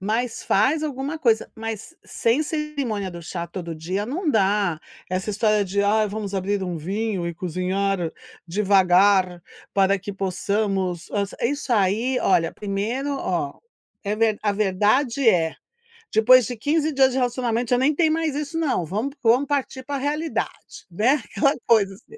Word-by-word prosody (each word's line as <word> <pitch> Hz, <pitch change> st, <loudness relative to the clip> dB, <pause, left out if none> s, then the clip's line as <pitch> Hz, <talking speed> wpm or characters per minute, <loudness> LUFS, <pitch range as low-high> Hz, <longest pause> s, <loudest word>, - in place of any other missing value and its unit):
Mas 225 Hz, +4 st, -2 dB
faz 265 Hz, +10 st, +2 dB
alguma 285 Hz, +1 st, -3 dB
coisa, 230 Hz, -6 st, +1 dB
mas 225 Hz, +8 st, -6 dB
sem 235 Hz, +6 st, +1 dB
cerimônia 285 Hz, -, -3 dB
do 170 Hz, -1 st, -9 dB
chá 170 Hz, +1 st, -5 dB
todo 170 Hz, -1 st, -6 dB
dia 180 Hz, +6 st, -3 dB
não 305 Hz, -, -1 dB
dá, 200 Hz, -, +2 dB, 0.3 s
essa 185 Hz, +3 st, -2 dB
história 210 Hz, 0 st, +2 dB
de: 200 Hz, +2 st, 0 dB
"Ai, 215 Hz, +1 st, +3 dB
vamos 205 Hz, -1 st, -5 dB
abrir 195 Hz, +1 st, -1 dB
um 180 Hz, -2 st, -3 dB
vinho 190 Hz, +3 st, -2 dB
e 170 Hz, -, -4 dB
cozinhar 185 Hz, +1 st, -1 dB, 0.3 s
devagar 190 Hz, -1 st, +3 dB, 0.3 s
para 195 Hz, 0 st, +3 dB
que 200 Hz, +2 st, -6 dB
possamos 195 Hz, -2 st, -1 dB
a" 200 Hz, +2 st, -1 dB
isso 280 Hz, -1 st, -2 dB
aí 225 Hz, +5 st, +2 dB
olha, 165 Hz, -3 st, +2 dB
primeiro, 210 Hz, +7 st, -3 dB
ó, 170 Hz, -, -2 dB, 0.5 s
é 205 Hz, +1 st, 0 dB
ver 220 Hz, -1 st, +1 dB
a 205 Hz, -1 st, +1 dB
verdade 215 Hz, +7 st, +1 dB
é: 165 Hz, -6 st, +3 dB, 0.6 s
depois 240 Hz, +1 st, +6 dB
de 245 Hz, -, -5 dB
15 305 Hz, +6 st, +1 dB
dias 265 Hz, -2 st, +4 dB
de 255 Hz, -, -2 dB
relacionamento 245 Hz, -2 st, 0 dB
já 245 Hz, -, +4 dB
nem 270 Hz, +5 st, +3 dB
tem 320 Hz, +1 st, +3 dB
mais 315 Hz, -2 st, 0 dB
isso 300 Hz, +2 st, -3 dB
não. 275 Hz, -, 0 dB
Vamo 215 Hz, -, -2 dB
vamos 245 Hz, +4 st, +4 dB
partir 275 Hz, -2 st, -2 dB
pra 285 Hz, 0 st, -3 dB
realidade, 300 Hz, +4 st, -4 dB
né, 245 Hz, -, +2 dB
aquela 275 Hz, +8 st, +1 dB
coisa 210 Hz, -4 st, +4 dB
assim. 435 Hz, -, -16 dB
215 Hz, 160 wpm, -23 LUFS, 190-260 Hz, 0.6 s, depois